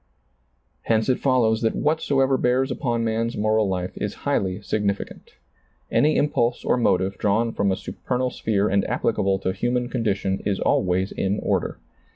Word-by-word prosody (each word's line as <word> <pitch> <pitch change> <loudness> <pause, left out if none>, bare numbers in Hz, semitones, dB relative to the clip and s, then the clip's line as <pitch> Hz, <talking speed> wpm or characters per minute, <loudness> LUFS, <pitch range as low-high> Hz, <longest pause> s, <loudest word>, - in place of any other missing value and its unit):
Hence 110 0 +1
it 130 - +2
follows 120 -5 +2
that 115 - +1
whatsoever 140 -3 +1
bears 130 +1 +1
upon 120 -2 -1
man's 115 +1 -1
moral 110 0 +2
life 90 -1 -2
is - - -3
highly 95 0 0
significant 100 -1 -3 0.6
Any 155 +1 +3
im 145 - +3
pulse 120 -3 0
or - - +3
motive 95 -5 +1
drawn 110 +3 +1
from 100 -1 +1
a - - +1
supernal 125 +5 -3
sphere 105 -3 0
and 100 0 +2
^plicable 100 -4 0
to 95 - 0
human 120 +2 -1
condition 100 -6 -1
is 100 -2 -1
always 95 +1 +1
in 95 +2 -1
order. - - -1
110 Hz, 160 wpm, -23 LUFS, 100-125 Hz, 0.6 s, Any